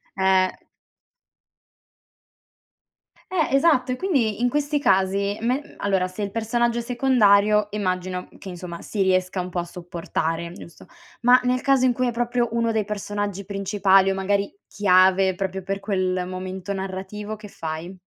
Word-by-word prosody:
Eh. 190 -1 +3 2.8
Eh 320 -7 0
esatto, 275 -4 +3
e 255 - -2
quindi 255 - 0
in 245 - +3
questi 295 +2 0
casi, 195 -2 +1
me 255 +5 -2
allora 190 -2 +1
se 185 +3 -8
il 200 - -3
personaggio 235 +2 0
è - - -2
secondario, 215 -4 +3
immagino 185 -2 -3
che - - -11
insomma 175 -2 -7
si 205 - -3
riesca 185 0 +1
un 180 - -6
po' 180 - -3
a 175 - -2
sopportare, 170 -1 -4
giusto? 170 - -13 0.4
Ma 245 +1 +7
nel 250 0 +1
caso 270 -1 +2
in 255 - +4
cui 255 +1 0
è - - 0
proprio 240 0 0
uno 230 0 +1
dei 220 -2 0
personaggi 205 -1 -4
principali 195 -1 +2
o - - 0
magari 200 - -1
chiave 190 -1 +4
proprio 190 0 -3
per 195 +1 -4
quel 185 -3 -1
momento 185 +1 -6
narrativo, 195 +2 -5
che 210 -1 -12
fai? 165 +2 -6
200 Hz, 150 wpm, -23 LUFS, 185-235 Hz, 2.8 s, Ma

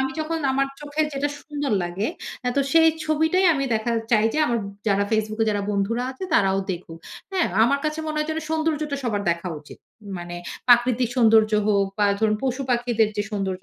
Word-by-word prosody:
আমি 265 0 0
যখন 325 +1 -2
আমার 275 +1 +1
চোখের 295 +1 -1
যেটা 280 +1 -1
সুন্দর 290 -4 -3
লাগে 175 +5 -2 0.4
আ - - +3
তো - - +4
সেই 325 0 +6 0.2
ছবিটাই 320 +4 +2
আমি 275 -1 -1
দেখা 220 +2 -1 0.2
চাই 215 -1 +4
যে - - 0
আমার 235 -1 0 0.3
যারা 200 0 +2
Facebook 215 0 -1
এ - - +4
যারা 205 -1 -1
বন্ধুরা 205 +4 0
আছে 265 +8 -7
তারাও 195 -5 +3
দেখুক। 170 -2 -7 0.3
হ্যাঁ? 370 -2 +2 0.2
আমার 280 +4 +2
কাছে 305 +1 -1
মনে 310 - -3
হয় 305 - 0
যেন 315 - -2
সৌন্দর্যটা 310 -2 -1
সবার 210 -4 -1
দেখা 170 +2 -2
উচিত। 145 - -14 0.4
মানে 175 0 -7 0.3
প্রাকৃতিক 245 0 +4
সৌন্দর্য 220 -2 +5
হোক, 200 -2 +3
বা 205 - +3
ধরুন 215 -1 +2
পশু 265 +1 -1
পাখিদের 240 -2 +2
যে 205 - +1
সৌন্দর্য 195 -3 -3
240 Hz, 195 wpm, -23 LUFS, 205-295 Hz, 0.4 s, সেই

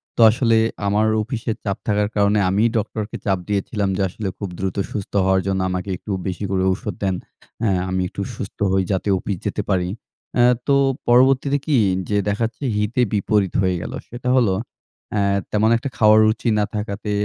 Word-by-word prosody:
তো - - +1
আসলে 115 -1 +2 0.3
আমার 105 +2 +2
অফিসে 115 0 -3
চাপ 100 -2 -2
থাকার 105 0 +2
কারণে 100 0 +3
আমিই 105 +5 +3
ডক্টরকে 105 0 -3
চাপ 95 -2 +2
দিয়েছিলাম 100 0 -1
যে - - -1
আসলে 100 +2 -5
খুব 100 -3 -5
দ্রুত 95 +1 -2
সুস্থ 105 -1 -5
হওয়ার 95 0 +3
জন্য 95 -1 0
আমাকে 90 +1 -3
একটু 105 - -7 0.2
বেশি 95 +2 -4
করে 95 -1 +1
ঔষধ 100 +1 -3
দেন। 95 -2 +1 0.5
অ্যা 110 -4 +2 0.2
আমি 95 0 0
একটু 100 - -6
সুস্থ 100 - -7
হই 95 0 +2
যাতে 95 +2 -1
অফিস 95 0 -3
যেতে 105 +1 -1
পারি। 90 -2 +1 0.5
অ্যা 120 -1 +5 0.2
তো 140 - +4 0.3
পরবর্তীতে 135 +3 +4
কি 150 -5 +2 0.3
যে 105 - +1
দেখা 105 +3 -1
যাচ্ছে 115 +5 -7
হিতে-বিপরীত 105 -3 +1
হয়ে 95 -1 +1
গেলো। - - -6
সেটা 125 +1 -4
হলো 115 -7 +3 0.6
অ্যা 100 -1 +1 0.3
তেমন 110 +1 +3
একটা 135 +3 -4
খাওয়ার 110 0 +6
রুচি 110 +2 +1
না 105 - +2
থাকাতে 105 0 -4
105 Hz, 180 wpm, -21 LUFS, 95-115 Hz, 0.6 s, খাওয়ার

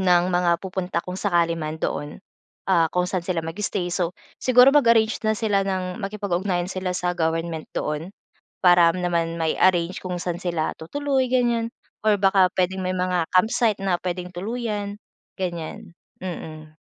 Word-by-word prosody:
ng 180 -2 +4
mga 175 0 +3
pupunta 185 -2 -3
kung 180 +1 -5
sakali 170 -4 +1
man, 155 0 -4
doon, 150 +1 -4 0.5
ah, 165 -3 +4
kung 180 +2 0
saan 185 0 -1
sila 175 -3 -1
mag-stay. 175 +1 -3
So, 175 -1 -1 0.3
siguro 255 +1 +7
mag-arrange 230 -6 +4
na 215 - +3
sila 205 -2 +1
ng 185 -1 -2
makipag-ugnayan 190 -3 -2
sila 185 -1 -3
sa 180 0 0
government 165 -1 -2
doon, 155 +6 -3 0.5
para 175 -2 +6
naman 170 -2 -1
mai-arrange 170 +2 +2
kung 180 -1 -4
saan 175 -1 -3
sila 170 -4 -1
tutuloy, 270 - 0
ganiyan, 240 -2 +1 0.4
or 210 -1 +5
baka 195 -1 +5
puwedeng 185 +1 0
may 185 0 -1
mga 180 -2 +1
campsite, 215 +2 +3
na 190 -2 +1
puwedeng 180 0 -3
tuluyan, 205 +1 -3 0.4
ganiyan. 175 +2 -5 0.3
Mm. 155 -4 -7
180 Hz, 150 wpm, -23 LUFS, 170-200 Hz, 0.5 s, siguro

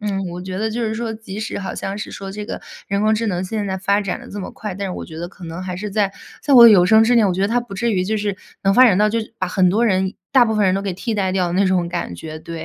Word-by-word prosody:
嗯， 200 -2 -2
我 175 - -6
觉 185 0 -5
得 220 +1 -1
就 240 +2 -3
是 220 -1 -1
说， 225 0 -3
即 215 -2 -8
使 220 -1 -4
好 195 - -5
像 195 +1 -4
是 - - -6
说 195 -1 -7
这 210 0 -6
个 - - -5 0.3
人 200 0 0
工 215 +1 +3
智 225 +1 -1
能 185 -3 -1
现 210 +2 -3
在 190 -1 -2
发 200 +2 +1
展 195 -3 -3
得 - - -12
这 205 - -6
么 185 - -6
快， 210 -4 -6
但 200 +1 -4
是 - - -4
我 - - -6
觉 160 -1 -10
得 175 - -5
可 185 -1 -13
能 165 +2 -6
还 185 -1 -5
是 210 +3 -5
在 200 -1 0 0.3
在 285 -2 +3
我 235 -1 +11
有 200 -6 +7
生 220 +2 +6
之 245 - +3
年， 225 -4 +4
我 185 - +1
觉 190 - -1
得 200 - +2
它 240 +2 +1
不 230 -5 -9
至 235 +3 0
于 185 - +1
就 220 +3 -1
是 205 -2 -2 0.3
能 195 0 +3
发 255 - +8
展 200 -7 +5
到 210 0 +4
就 230 +2 0 0.2
把 185 - -1
很 185 0 +2
多 225 +5 +2
人 190 -2 +1 0.2
大 255 -3 +6
部 220 -1 -1
分 210 - +3
人 185 - +2
都 195 - -1
给 195 -2 -2
替 220 +5 -3
代 195 -3 0
掉 185 -1 0
的 - - -4
那 190 +3 +2
种 185 -2 +1
感 90 - -4
觉， 155 - -8
对。 165 0 -7
200 Hz, 360 characters per minute, -20 LUFS, 185-220 Hz, 0.3 s, 我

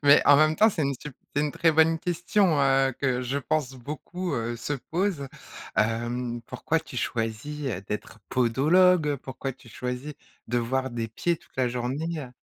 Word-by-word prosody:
mais 145 +1 +7
en 145 - +8
même 155 +2 +4
temps, 220 - +6
c'est 175 -7 -1
une 140 -1 0
sup 140 +1 -9 0.2
c'est 145 - +2
une 150 - 0
très 165 - +3
bonne 160 +1 +4
question, 175 -2 +2
heu, 135 -1 +3
que 130 -2 +1
je 135 +3 -1
pense 145 -2 -1
beaucoup, 155 +6 -5
heu, 115 0 -2
se 120 +5 -4
pose, 165 +1 -2 0.5
hem. 120 +2 0
Pourquoi 165 +7 -1
tu 125 - -11
choisis, 115 +7 -3
heu, 100 -7 -3
d'être 105 +1 -5
podologue, 150 +8 +4
heu, 145 - +1
pourquoi 135 0 -5
tu 125 -1 -18
choisis 125 +5 -4 0.4
de 120 - +1
voir 130 +3 -1
des 115 -1 -3
pieds 170 +10 0
toute - - -26
la 130 -1 +2
journ 125 +1 -2
ée, 165 0 -2
heu 125 -3 -8
135 Hz, 195 wpm, -26 LUFS, 120-155 Hz, 0.5 s, en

